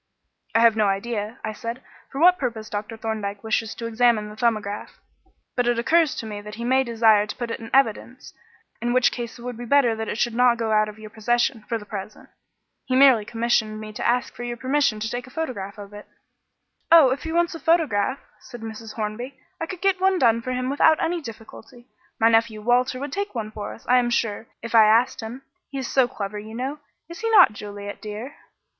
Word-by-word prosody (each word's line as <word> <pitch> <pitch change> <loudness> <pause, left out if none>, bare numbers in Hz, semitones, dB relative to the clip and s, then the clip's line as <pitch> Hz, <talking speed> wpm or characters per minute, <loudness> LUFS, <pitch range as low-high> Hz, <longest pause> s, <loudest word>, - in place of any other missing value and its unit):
"I 230 - +5
have 230 -1 +6
no 215 -2 +2
idea," 210 +3 -2
I 215 - -3
said, 230 +3 -6 0.3
"for 270 - -5
what 360 +3 +6
purpose 230 -4 -4
Dr. 210 +2 -5
Thorndyke 215 -3 -4
wishes 220 0 -1
to 230 - -6
examine 230 -2 +2
the 210 - -10
'Thumbograph,' 215 -3 -2 0.6
but 245 -1 +1
it 240 -1 +2
occurs 315 +5 +3
to - - -5
me 210 -1 -6
that 210 +1 -9
he 235 - -6
may 260 +2 +3
desire 225 -3 +3
to - - -6
put 240 -2 -4
it - - -4
in 225 0 -9
evidence, 255 0 0 0.5
in 240 +1 0
which 255 0 +4
case 240 -1 -6
it 235 - -12
would 245 -2 -5
be 240 - -7
better 245 -2 +3
that 220 0 -4
it - - -3
should 240 0 0
not 245 0 +4
go 225 -1 -2
out 215 0 +3
of 210 - -11
your 215 -1 -11
possession 240 +2 0
for 230 - 0
the 210 - -11
present. 205 0 -8 0.6
He 255 - -1
merely 260 -5 +6
commissioned 225 -1 0
me 215 0 -8
to - - -2
ask 245 +1 0
for - - -10
your 240 0 -4
permission 260 -3 +1
to 215 - -1
take 245 +2 -5
a - - -12
photograph 245 -10 -5
of 205 0 -10
it." 205 0 -11 0.8
"Oh, 320 -6 +8
if 265 - -2
he 320 - -5
wants 340 +1 +1
a 330 - -7
photograph," 280 -9 +2 0.2
said 240 -2 -11
Mrs. 220 0 -8
Hornby, 235 +5 -5 0.2
"I 325 - -3
could 370 0 -7
get 385 -1 +1
one 380 0 +3
done 230 -6 +3
for 255 - -4
him 255 +1 -2
without 310 +2 +4
any 340 +1 -1
difficulty. 230 0 -12 0.3
My 225 - +5
nephew 225 -1 +1
Walter 250 +2 +2
would 280 0 -5
take 400 -6 -3
one 215 -2 -4
for 210 -1 -6
us, - - -19
I 250 +1 +5
am 240 -1 0
sure, 230 -2 -1 0.2
if 230 - -6
I 225 -2 +8
asked 230 +4 +3
him. 235 +4 -8 0.3
He 275 - -6
is 265 -2 -3
so 260 -2 +3
clever, 210 -2 -5
you 220 +2 -9
know 270 +5 -4 0.3
is 340 +1 -10
he 455 - -1
not, 430 - +7
Juliet, 205 -1 -8
dear?" 220 +6 -7
235 Hz, 225 wpm, -23 LUFS, 215-255 Hz, 0.8 s, Oh